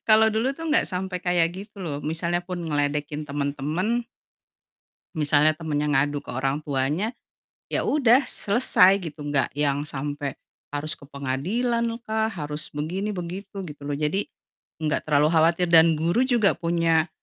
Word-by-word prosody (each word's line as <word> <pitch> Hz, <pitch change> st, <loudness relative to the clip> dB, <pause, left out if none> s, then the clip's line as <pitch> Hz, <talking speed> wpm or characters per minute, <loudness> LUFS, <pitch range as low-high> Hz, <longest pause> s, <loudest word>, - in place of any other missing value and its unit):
kalau 220 Hz, 0 st, +6 dB
dulu 225 Hz, +5 st, 0 dB
tuh 325 Hz, +3 st, -6 dB
nggak 305 Hz, -, +3 dB
sampai 185 Hz, 0 st, -3 dB
kayak 175 Hz, -2 st, +3 dB
gitu 200 Hz, +1 st, -10 dB
loh 155 Hz, -6 st, -3 dB
misalnya 170 Hz, +3 st, -1 dB
pun 180 Hz, -1 st, -5 dB
ngeledekin 150 Hz, -1 st, -1 dB
temen-temen 150 Hz, -, -1 dB, 1.1 s
misalnya 150 Hz, +1 st, +3 dB
temennya 150 Hz, -2 st, -2 dB
ngadu 145 Hz, 0 st, +1 dB
ke -, -, -21 dB
orang 135 Hz, +3 st, -1 dB
tuanya, 150 Hz, -, -1 dB, 0.5 s
ya -, -, -1 dB
udah 265 Hz, -2 st, +4 dB
selesai 200 Hz, -3 st, +4 dB, 0.2 s
gitu, 150 Hz, -, -15 dB
nggak 140 Hz, -2 st, 0 dB
yang 145 Hz, 0 st, 0 dB
sampai 145 Hz, -1 st, -4 dB, 0.4 s
harus 145 Hz, +2 st, -2 dB
ke -, -, -15 dB
pengadilan 185 Hz, -, -1 dB, 0.2 s
lah, 220 Hz, 0 st, +1 dB
harus 150 Hz, -3 st, -4 dB
begini 180 Hz, +8 st, -3 dB
begitu, 190 Hz, +2 st, -6 dB
gitu 150 Hz, -4 st, -10 dB
loh, 145 Hz, -, -3 dB
jadi 155 Hz, +7 st, 0 dB, 0.6 s
nggak 150 Hz, -2 st, 0 dB
terlalu 150 Hz, 0 st, +3 dB
khawatir 165 Hz, +2 st, +3 dB
dan 165 Hz, -1 st, +6 dB
guru 170 Hz, +9 st, +2 dB
juga 240 Hz, -6 st, +2 dB
punya, 165 Hz, -1 st, +1 dB
165 Hz, 145 wpm, -25 LUFS, 145-195 Hz, 1.1 s, kalau